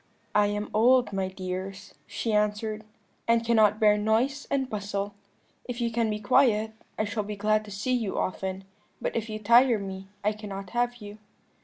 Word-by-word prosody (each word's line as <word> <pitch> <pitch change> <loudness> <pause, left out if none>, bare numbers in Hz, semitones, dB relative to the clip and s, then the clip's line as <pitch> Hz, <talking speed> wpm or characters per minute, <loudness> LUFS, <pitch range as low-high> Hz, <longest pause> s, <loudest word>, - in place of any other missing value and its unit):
"'I 210 0 +4
am 205 0 -3
old, 245 +1 +4
my 190 -1 0
dears,' 190 +1 -6
she 215 +2 -2
answered, 210 +1 0 0.4
'and 230 0 +3
cannot 215 -2 +4
bear 210 -2 +5
noise 235 +7 +1
and 270 -2 0
bustle; 205 -2 -3 0.5
if 245 -1 -5
you 235 -1 0
can 230 -1 +1
be 210 0 -2
quiet, 220 0 +3 0.2
I - - +1
shall 210 +1 -2
be 210 0 -5
glad 215 +1 +1
to - - -11
see 210 +6 -2
you 225 -6 -1
often, 190 +1 -2 0.4
but - - -3
if 230 -1 -2
you 215 - -3
tire 235 +3 +5
me 195 -1 -6 0.2
I 210 - +3
cannot 200 -3 -7
have 240 0 0
you.' 210 -2 -10
210 Hz, 180 wpm, -27 LUFS, 205-230 Hz, 0.5 s, bear